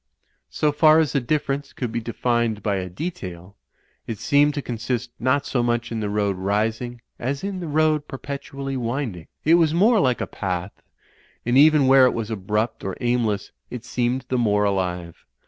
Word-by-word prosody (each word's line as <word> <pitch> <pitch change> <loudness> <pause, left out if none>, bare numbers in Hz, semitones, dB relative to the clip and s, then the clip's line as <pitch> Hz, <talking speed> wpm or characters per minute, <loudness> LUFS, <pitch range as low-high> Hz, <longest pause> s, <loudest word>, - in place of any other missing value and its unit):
So 150 - +1
far 155 +1 +5
as 160 -2 +2
the 140 - +2
difference 140 +2 -2
could 125 -3 -4
be 115 - -2
defined 115 -2 -1
by 100 -2 0
a 90 -1 -4
detail, 95 - -7 0.5
it 115 - -4
seemed 145 +5 +3
to 145 - -2
consist 120 +1 -3
not 130 +3 +1
so 125 - 0
much 120 0 -1
in 115 - -2
the 105 -1 -2
road 100 -2 0
rising 110 +5 -1 0.2
as 135 +3 -3
in 195 -1 -3
the 175 - -5
road 155 0 +1
perpetually 140 0 -6
winding. 115 - -3 0.2
It 160 - +5
was 160 -1 +2
more 215 +5 +5
like 130 -8 +2
a - - -1
path; 90 -1 -4 0.6
and 120 +1 +1
even 150 0 +6
where 130 -1 +7
it - - 0
was 115 -1 -3
abrupt 105 +2 -2
or 95 -1 -4
aimless, 120 -4 0 0.2
it 125 -1 -7
seemed 120 +2 -1
the 125 - +1
more 105 -3 +2
alive. 90 -4 -2
120 Hz, 180 wpm, -23 LUFS, 105-140 Hz, 0.6 s, where